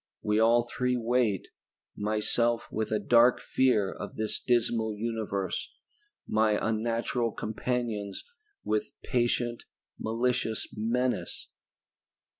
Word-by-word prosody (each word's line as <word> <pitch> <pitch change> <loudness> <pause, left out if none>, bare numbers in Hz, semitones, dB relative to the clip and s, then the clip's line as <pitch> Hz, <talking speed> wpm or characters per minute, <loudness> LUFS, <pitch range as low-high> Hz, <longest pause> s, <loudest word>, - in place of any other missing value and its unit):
We 105 +1 +2
all 115 +2 +5
three 125 +1 -1
wait, 115 -4 +1 0.5
myself 110 +3 0
with 110 0 -2
a 110 - +3
dark 120 +4 +5
fear 110 -7 +2
of 100 - -7
this 110 0 -2
dismal 115 -3 +1
universe, 110 -4 -2 0.6
my 110 -1 +3
unnatural 115 +1 0
companions 110 -3 -3 0.4
with 105 0 -1
patient, 120 -1 0 0.3
malicious 115 0 0
menace. 125 +4 -1
115 Hz, 95 wpm, -29 LUFS, 110-120 Hz, 0.6 s, all